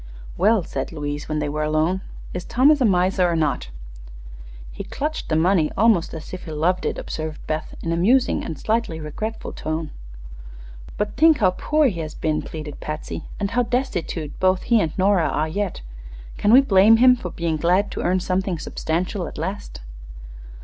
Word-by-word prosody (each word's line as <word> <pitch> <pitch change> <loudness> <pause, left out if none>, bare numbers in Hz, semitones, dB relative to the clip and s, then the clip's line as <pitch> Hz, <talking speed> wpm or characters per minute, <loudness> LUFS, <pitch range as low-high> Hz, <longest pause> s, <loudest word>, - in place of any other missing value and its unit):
"Well," 205 +2 +3
said - - -4
Louise, 145 0 -5
when 155 - -1
they 150 -1 -1
were 150 +1 -2
alone, 155 +5 +1 0.3
"is 180 - -4
Thomas 280 +7 +3
a - - +5
miser 185 -2 +2
or 170 - 0
not?" 150 - -1 1.0
"He - - -7
clutched 305 +2 -4
the 155 - +1
money 165 -1 +3
almost 210 -7 +3
as 160 +2 -9
if 185 - -7
he 160 - -7
loved 170 +4 0
it," - - -2
observed 155 -1 -5
Beth, 155 0 -4
in 165 - -2
a - - +1
musing 240 +10 +2
and 160 - -5
slightly 220 -6 -1
regretful 215 +9 -5
tone. 155 0 -4 1.1
"But 210 0 -2
think 320 -1 +6
how 190 -5 +3
poor 305 +10 +1
he 195 -10 0
has 155 -1 -5
been," 155 -1 -1
pleaded 150 -2 -7
Patsy, 155 +1 -5
"and 200 -1 -1
how 245 +2 +2
destitute 205 - -2
both 185 0 +2
he 235 -3 +3
and 160 - -1
Nora 190 -3 +3
are 155 - 0
yet. 195 +3 -3 0.5
Can 205 - +2
we 255 +3 +9
blame 215 -2 +6
him 250 +1 +6
for 185 -7 -6
being 165 -1 -2
glad 180 +6 +2
to - - -4
earn 185 +1 +1
something 185 0 -1
substantial 175 +4 -3
at - - -9
last?" 165 - -5
180 Hz, 185 wpm, -22 LUFS, 155-210 Hz, 1.1 s, we